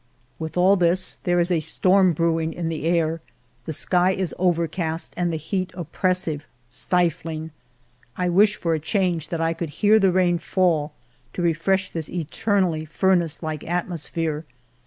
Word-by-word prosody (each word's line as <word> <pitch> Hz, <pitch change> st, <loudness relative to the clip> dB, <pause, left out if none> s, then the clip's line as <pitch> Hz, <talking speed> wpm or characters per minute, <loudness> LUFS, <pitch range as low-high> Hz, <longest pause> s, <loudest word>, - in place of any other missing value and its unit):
With 160 Hz, +1 st, -5 dB
all 190 Hz, +3 st, +5 dB
this, 180 Hz, +1 st, 0 dB
there 175 Hz, 0 st, +2 dB
is 175 Hz, +1 st, +1 dB
a 170 Hz, -, +3 dB
storm 185 Hz, +3 st, +3 dB
brewing 165 Hz, 0 st, 0 dB
in 170 Hz, -2 st, -3 dB
the 160 Hz, -1 st, -4 dB
air, 165 Hz, -1 st, +1 dB, 0.4 s
the 160 Hz, -, -4 dB
sky 180 Hz, +4 st, +2 dB
is 185 Hz, -3 st, -2 dB
overcast, 170 Hz, -2 st, -1 dB
and 175 Hz, -1 st, 0 dB
the 160 Hz, -, -2 dB
heat 185 Hz, +4 st, -2 dB
oppressive, 175 Hz, -2 st, -1 dB, 0.2 s
stifling. 165 Hz, +1 st, -1 dB, 0.7 s
I 180 Hz, -, 0 dB
wish 205 Hz, +4 st, +4 dB
for 165 Hz, -4 st, -1 dB
a 160 Hz, -, 0 dB
change 170 Hz, -1 st, 0 dB
that 165 Hz, -1 st, -3 dB
I 165 Hz, 0 st, +1 dB
could 165 Hz, -1 st, -4 dB
hear 205 Hz, +8 st, +4 dB
the 195 Hz, -2 st, +4 dB
rain 175 Hz, -1 st, +2 dB
fall 165 Hz, -5 st, +1 dB, 0.4 s
to 175 Hz, -, -3 dB
refresh 185 Hz, +3 st, +1 dB
this 160 Hz, -2 st, -5 dB
eternally 175 Hz, 0 st, 0 dB
furnace 170 Hz, 0 st, +1 dB
like 155 Hz, -2 st, -4 dB
at 175 Hz, 0 st, 0 dB
mosphere. 160 Hz, -2 st, -3 dB
170 Hz, 160 wpm, -23 LUFS, 160-185 Hz, 0.7 s, all